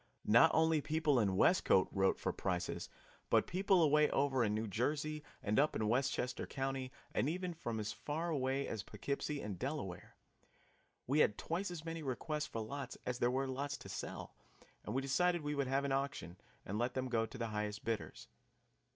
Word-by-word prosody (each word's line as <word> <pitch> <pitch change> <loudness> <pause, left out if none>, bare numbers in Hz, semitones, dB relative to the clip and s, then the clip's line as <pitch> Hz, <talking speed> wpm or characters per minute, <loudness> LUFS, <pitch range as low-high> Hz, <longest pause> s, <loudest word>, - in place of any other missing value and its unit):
Not 115 +3 +7
only 160 -1 +4
people 155 -3 +2
in 100 -4 +2
Westcote 95 - +4
wrote 95 -1 +2
for - - -2
prices, 90 -2 -2 0.4
but - - +4
people 190 -1 +3
away 150 0 +5
over 135 -2 +2
in 105 -1 +1
New 110 +1 -1
Jersey 150 +8 -1 0.2
and 105 +3 +2
up 150 +2 +3
in 110 - 0
Westchester 125 +1 0
Country, 135 -1 -3 0.2
and 135 - +1
even 180 +1 -2
from 120 -9 -4
as 105 0 -2
far 160 +4 -3
away 135 -1 0
as 110 - -3
Poughkeepsie 140 +6 -3
and 100 -4 -5
Delaware. 120 - -4 0.9
We 140 +4 +2
had 105 - +4
twice 180 +4 -2
as 170 -2 -7
many 165 0 -4
requests 150 +2 -2
for 115 - -4
lots 130 +4 -5
as 125 -1 -2
there 120 - +3
were 135 +2 0
lots 135 +1 -3
to 95 - -11
sell, 90 - -6 0.5
and 105 - -4
we 135 - +1
decided 175 +6 +2
we 145 0 -2
would 140 -2 0
have 135 +2 +1
an 140 - -1
auction 135 - -2 0.3
and 105 +3 -3
let 120 +1 0
them 130 0 -1
go 115 -2 +1
to 130 - -10
the 115 -2 -2
highest 105 0 -3
bidders. 115 -2 -3
135 Hz, 190 wpm, -36 LUFS, 110-150 Hz, 0.9 s, Not